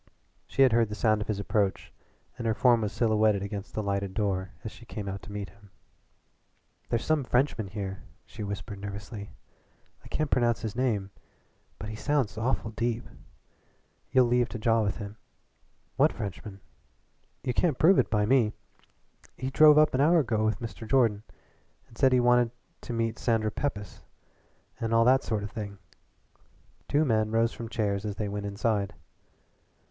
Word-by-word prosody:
She 135 Hz, -, +3 dB
had 130 Hz, -, +5 dB
heard 115 Hz, -1 st, +3 dB
the 105 Hz, -, -4 dB
sound 110 Hz, -1 st, +2 dB
of -, -, -4 dB
his 105 Hz, -2 st, -2 dB
approach 100 Hz, -1 st, -1 dB, 0.4 s
and 120 Hz, -2 st, -4 dB
her 110 Hz, -, +1 dB
form 120 Hz, -3 st, +4 dB
was 105 Hz, -1 st, -1 dB
silhouetted 110 Hz, -3 st, +2 dB
against 100 Hz, 0 st, -6 dB
the 110 Hz, -, -1 dB
lighted 100 Hz, -1 st, -2 dB
door 95 Hz, -3 st, -1 dB
as 110 Hz, -, -5 dB
she -, -, -14 dB
came 105 Hz, -3 st, -7 dB
out 95 Hz, 0 st, -4 dB
to -, -, -11 dB
meet 100 Hz, -2 st, -5 dB
him. 100 Hz, +1 st, -20 dB, 1.2 s
"There's 115 Hz, -, -1 dB
some 155 Hz, -3 st, +2 dB
Frenchman 125 Hz, -4 st, +1 dB
here," 95 Hz, -1 st, -5 dB, 0.2 s
she 110 Hz, -, -10 dB
whispered 100 Hz, 0 st, -5 dB
nervously. 100 Hz, +1 st, -7 dB, 0.7 s
"I -, -, -12 dB
can't 155 Hz, -1 st, -2 dB
pronounce 120 Hz, -2 st, +2 dB
his 110 Hz, -1 st, -4 dB
name, 110 Hz, -6 st, 0 dB, 0.7 s
but 105 Hz, -, -7 dB
he 110 Hz, -, -5 dB
sounds 135 Hz, -2 st, 0 dB
awful 115 Hz, 0 st, -1 dB
deep. 115 Hz, +1 st, -2 dB, 1.0 s
You'll 125 Hz, -2 st, +4 dB
have 120 Hz, -1 st, +3 dB
to -, -, -5 dB
jaw 115 Hz, +1 st, +2 dB
with 100 Hz, -2 st, -1 dB
him." 105 Hz, 0 st, -7 dB, 0.8 s
"What -, -, +4 dB
Frenchman?" 100 Hz, 0 st, -7 dB, 0.8 s
"You 125 Hz, -, -1 dB
can't 155 Hz, -1 st, +1 dB
prove 180 Hz, +4 st, +5 dB
it -, -, +2 dB
by 105 Hz, -1 st, +2 dB
me. 115 Hz, -2 st, +3 dB, 0.8 s
He 130 Hz, 0 st, -3 dB
drove 150 Hz, +1 st, +7 dB
up 155 Hz, 0 st, +5 dB
an 130 Hz, -, +2 dB
hour 165 Hz, +4 st, +5 dB
ago 115 Hz, -8 st, +1 dB
with 110 Hz, 0 st, 0 dB
Mr. 115 Hz, -1 st, -7 dB
Jordan, 115 Hz, -6 st, +3 dB, 0.7 s
and 115 Hz, -, -19 dB
said 130 Hz, +3 st, +4 dB
he 130 Hz, -, +4 dB
wanted 120 Hz, -1 st, +4 dB, 0.3 s
to -, -, -7 dB
meet 115 Hz, -1 st, -1 dB
Sandra 110 Hz, -2 st, +1 dB
Pepys, 105 Hz, -7 st, -4 dB, 0.8 s
and 115 Hz, 0 st, 0 dB
all 115 Hz, 0 st, +5 dB
that 130 Hz, +2 st, +5 dB
sort 110 Hz, -2 st, -2 dB
of 105 Hz, -, -6 dB
thing." 100 Hz, -3 st, -6 dB, 1.1 s
Two 150 Hz, +2 st, +2 dB
men 110 Hz, -4 st, +2 dB
rose 115 Hz, +1 st, +2 dB
from 115 Hz, -1 st, -7 dB
chairs 100 Hz, -3 st, -1 dB
as 105 Hz, -2 st, -3 dB
they 105 Hz, -, -3 dB
went 100 Hz, 0 st, -4 dB
inside. 100 Hz, -1 st, -1 dB
110 Hz, 175 wpm, -28 LUFS, 105-120 Hz, 1.2 s, drove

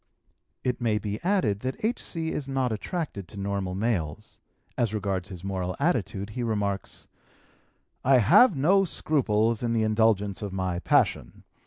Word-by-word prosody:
It 125 Hz, -1 st, -1 dB
may 110 Hz, -3 st, +1 dB
be 105 Hz, 0 st, -4 dB
added 170 Hz, -, +1 dB
that 130 Hz, -, -4 dB
H.C. 165 Hz, -8 st, -1 dB
is 140 Hz, -, -4 dB
not 135 Hz, -3 st, 0 dB
attracted 110 Hz, -, -4 dB
to 100 Hz, -, -9 dB
normal 100 Hz, -2 st, -2 dB
males. 95 Hz, -8 st, -2 dB, 0.4 s
As 110 Hz, -3 st, 0 dB
regards 100 Hz, -2 st, -2 dB
his 90 Hz, -2 st, -9 dB
moral 95 Hz, -2 st, -3 dB
attitude 110 Hz, -, -1 dB
he 125 Hz, -, -4 dB
remarks: 105 Hz, -4 st, -2 dB, 1.0 s
"I 135 Hz, 0 st, +5 dB
have 170 Hz, -, +6 dB
no 190 Hz, +8 st, +4 dB
scruples 115 Hz, -, +1 dB
in 120 Hz, -1 st, 0 dB
the 115 Hz, -1 st, +2 dB
indulgence 110 Hz, -2 st, +1 dB
of 100 Hz, -2 st, -5 dB
my 95 Hz, -2 st, -2 dB
passion. -, -, +1 dB
110 Hz, 150 wpm, -27 LUFS, 100-130 Hz, 1.0 s, have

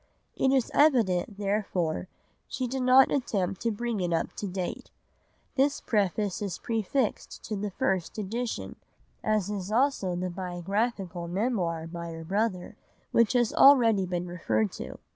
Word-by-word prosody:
It 265 Hz, -, +2 dB
is 265 Hz, -3 st, +1 dB
evident, 220 Hz, -, +3 dB
therefore, 195 Hz, -5 st, -1 dB, 0.4 s
she 255 Hz, -, -3 dB
did 260 Hz, +2 st, -3 dB
not 255 Hz, +1 st, +6 dB
attempt 195 Hz, -9 st, -1 dB
to 230 Hz, -, +1 dB
bring 230 Hz, 0 st, -2 dB
it 175 Hz, -1 st, -1 dB
up 165 Hz, -1 st, -1 dB
to 205 Hz, -, -3 dB
date. 185 Hz, -1 st, -4 dB, 0.6 s
This 280 Hz, +1 st, +2 dB
preface 205 Hz, -2 st, 0 dB
is 195 Hz, -4 st, -3 dB
prefixed 225 Hz, +1 st, -2 dB
to 215 Hz, -, -4 dB
the 205 Hz, +1 st, -3 dB
first 185 Hz, -1 st, -1 dB
edition, 225 Hz, +4 st, -4 dB, 0.5 s
as 215 Hz, -2 st, +1 dB
is 200 Hz, -1 st, -4 dB
also 230 Hz, -7 st, +1 dB
the 180 Hz, +1 st, -3 dB
biographical 185 Hz, 0 st, -3 dB
Memoir 175 Hz, -4 st, -1 dB
by 170 Hz, 0 st, -6 dB
her 165 Hz, 0 st, -7 dB
brother 195 Hz, +2 st, -1 dB, 0.4 s
which 230 Hz, -2 st, +3 dB
has 240 Hz, -3 st, +2 dB
already 230 Hz, -9 st, +6 dB
been 175 Hz, 0 st, -2 dB
referred 110 Hz, -, -1 dB
to. -, -, -7 dB
200 Hz, 145 wpm, -28 LUFS, 180-235 Hz, 0.6 s, not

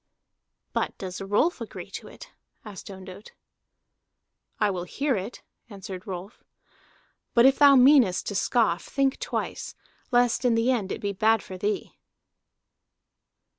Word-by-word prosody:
"But -, -, -2 dB
does 185 Hz, 0 st, -6 dB
Rolf 205 Hz, -, +1 dB
agree -, -, -8 dB
to -, -, -7 dB
it?" -, -, -13 dB, 0.3 s
asked 205 Hz, -3 st, -9 dB
Ondott. 190 Hz, +1 st, -11 dB, 1.3 s
"I 210 Hz, -2 st, +2 dB
will 180 Hz, -2 st, -4 dB
hear 275 Hz, +8 st, -1 dB
it," 200 Hz, +4 st, -6 dB, 0.3 s
answered 195 Hz, -1 st, -9 dB
Rolf. 190 Hz, +3 st, -8 dB, 0.9 s
"But 235 Hz, 0 st, +6 dB
if 270 Hz, 0 st, +5 dB
thou 285 Hz, -1 st, +8 dB
meanest 255 Hz, -7 st, +5 dB
to -, -, -3 dB
scoff, 205 Hz, -4 st, +1 dB
think 275 Hz, -1 st, 0 dB
twice, -, -, -4 dB, 0.3 s
lest 245 Hz, 0 st, +2 dB
in 245 Hz, -2 st, +3 dB
the 230 Hz, +3 st, +2 dB
end 210 Hz, -7 st, -1 dB
it -, -, -4 dB
be 200 Hz, -1 st, -2 dB
bad 220 Hz, +2 st, +2 dB
for 190 Hz, -, -9 dB
thee." 205 Hz, +3 st, -3 dB
210 Hz, 135 wpm, -26 LUFS, 190-245 Hz, 1.3 s, thou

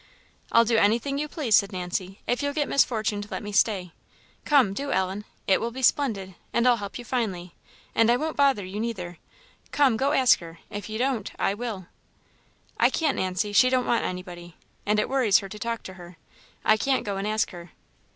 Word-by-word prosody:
"I'll 230 Hz, 0 st, +5 dB
do 230 Hz, 0 st, +2 dB
anything 235 Hz, +7 st, +2 dB
you 300 Hz, -, -2 dB
please," 285 Hz, -8 st, +1 dB
said 200 Hz, 0 st, +3 dB
Nancy, 185 Hz, +1 st, -4 dB
"if 245 Hz, -, 0 dB
you'll 285 Hz, 0 st, -2 dB
get 295 Hz, -2 st, 0 dB
Miss 280 Hz, -, +4 dB
Fortune 215 Hz, -3 st, -2 dB
to 205 Hz, -, -8 dB
let -, -, -5 dB
me 205 Hz, -, -6 dB
stay. 200 Hz, -4 st, +1 dB, 0.5 s
Come 270 Hz, -10 st, +4 dB
do, 280 Hz, +6 st, -4 dB
Ellen! 190 Hz, +2 st, -1 dB, 0.2 s
It 190 Hz, -, +3 dB
will 230 Hz, -, -1 dB
be 260 Hz, +3 st, -7 dB
splendid! 210 Hz, -9 st, +1 dB, 0.2 s
and 235 Hz, +1 st, +2 dB
I'll 245 Hz, -1 st, +5 dB
help 200 Hz, -2 st, -6 dB
you 245 Hz, -, -9 dB
finely, 195 Hz, -9 st, -3 dB, 0.4 s
and 225 Hz, 0 st, +3 dB
I 240 Hz, -, +4 dB
won't 315 Hz, +4 st, -3 dB
bother 275 Hz, -8 st, +2 dB
you 190 Hz, +3 st, -6 dB
neither. 185 Hz, -7 st, -4 dB, 0.5 s
Come, 270 Hz, -6 st, +3 dB
go 275 Hz, +4 st, +1 dB
ask 260 Hz, -4 st, +5 dB
her; 165 Hz, -1 st, -11 dB
if 205 Hz, 0 st, -6 dB
you 215 Hz, -, -4 dB
don't, 245 Hz, -4 st, -1 dB
I 195 Hz, -, +1 dB
will." 210 Hz, -4 st, -5 dB, 0.9 s
"I -, -, +5 dB
can't, 310 Hz, -4 st, 0 dB
Nancy; 185 Hz, +3 st, -1 dB
she 255 Hz, +4 st, +6 dB
don't 255 Hz, -1 st, +1 dB
want 235 Hz, -, +1 dB
anybody; 175 Hz, -2 st, -6 dB, 0.3 s
and 210 Hz, +1 st, +3 dB
it -, -, 0 dB
worries 250 Hz, -7 st, +3 dB
her 195 Hz, -, -5 dB
to 210 Hz, -, -9 dB
talk 230 Hz, +1 st, -3 dB
to 185 Hz, -, -8 dB
her. 175 Hz, -1 st, -13 dB, 0.5 s
I 215 Hz, -, +5 dB
can't 265 Hz, +4 st, 0 dB
go 200 Hz, -1 st, -3 dB
and 195 Hz, +1 st, -3 dB
ask 215 Hz, 0 st, 0 dB
her." 175 Hz, -2 st, -10 dB
215 Hz, 210 wpm, -25 LUFS, 190-255 Hz, 0.9 s, she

